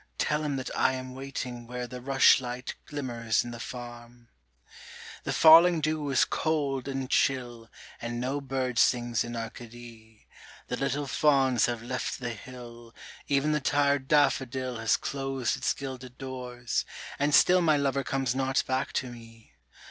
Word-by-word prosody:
Tell 150 0 0
him 145 -2 -1
that 130 -1 -5
I - - +2
am 130 0 -6
waiting 130 -3 -6
where 125 0 -5
The 125 +1 -8
rushlight 130 -1 +3
glimmers 120 -6 -1
in 120 - -7
the 120 - -8
Farm. 120 -1 -9 1.0
The - - -1
falling 165 +2 +7
dew 155 -1 -1
is 135 - +3
cold 140 -5 -1
and 135 -1 -3
chill, 120 -4 0 0.3
And 120 0 -4
no 135 +3 -2
bird 130 -3 -2
sings 120 -3 +2
in 120 0 -6
Arcady, 115 -1 -10 0.4
The 125 - -2
little 140 +1 -1
fauns 135 -4 +3
have 120 -2 -3
left 125 +1 -3
the 120 -2 -4
hill, 120 0 -11 0.3
Even 140 +1 +2
the 150 - +1
tired 140 -1 +1
daffodil 130 -3 +1
Has 115 0 +2
closed 135 -3 -2
its 130 - 0
gilded 130 -2 -8
doors, 125 -2 -4 0.4
and 145 +1 +3
still 180 0 +6
My 155 -3 +3
lover 140 -1 0
comes 135 -3 -1
not 135 0 0
back 130 +1 -2
to 125 - -2
me. 115 -2 -14
130 Hz, 155 wpm, -28 LUFS, 120-140 Hz, 1.0 s, falling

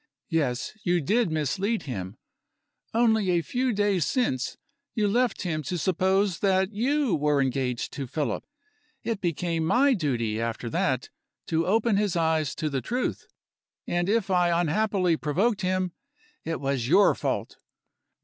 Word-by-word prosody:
Yes! 140 -7 -1
you 175 -2 +2
did 210 - +1
mislead 190 - -1
him. 95 -7 -5 0.7
Only 220 -4 +3
a 175 -2 +2
few 255 +5 0
days 205 -4 +1
since, 140 - -1 0.4
you 210 -2 +2
left 240 +4 +1
him 160 -4 -1
to 165 +5 -3
suppose 190 +2 +1
that 190 0 +2
you 260 - +1
were 150 -1 +2
engaged 130 -2 -1
to 135 -2 -4
Philip. 140 -4 -2 0.6
It 225 -4 -2
became 170 -1 -1
my 255 - +4
duty, 120 - -1
after 115 0 -3
that, - - 0 0.4
to 165 +1 +1
open 220 +1 +2
his 205 -3 +1
eyes 160 -3 +1
to 155 - -2
the 140 -3 -1
truth; 250 - -2 0.6
and 175 +1 0
if 210 -3 +1
I 175 -2 +3
unhappily 180 0 +1
provoked 195 +9 0
him, 185 -1 0 0.5
it 165 0 -3
was 135 -4 -1
your 190 +8 +5
fault. - - -3
175 Hz, 145 wpm, -26 LUFS, 150-205 Hz, 0.7 s, your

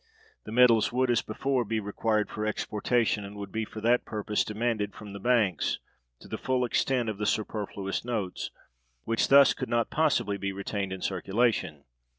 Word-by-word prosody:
The - - -7
metals 115 -2 +5
would, 125 0 +2
as 115 -2 +3
before, 130 +3 -1
be 110 0 -1
required 105 +1 0
for 105 - -4
exportation, 110 +1 0
and 100 +1 -9
would 100 -1 -7
be 110 0 -2
for 110 - -9
that 120 +2 +3
purpose 105 0 -1
demanded 110 -2 -2
from 105 -2 -9
the 100 - -7
banks, 110 -4 +2 0.4
to - - -12
the - - -5
full 130 -1 +1
extent 125 0 +1
of 105 -2 -3
the 105 - 0
superfluous 105 -2 -2
notes, 110 -6 -3 0.5
which 115 0 +1
thus 140 0 +7
could 130 - -5
not 120 -1 +1
possibly 145 -10 +1
be 100 0 -3
retained 100 0 -3
in 95 -1 -5
circulation. 95 -5 0
110 Hz, 175 wpm, -28 LUFS, 100-120 Hz, 0.5 s, thus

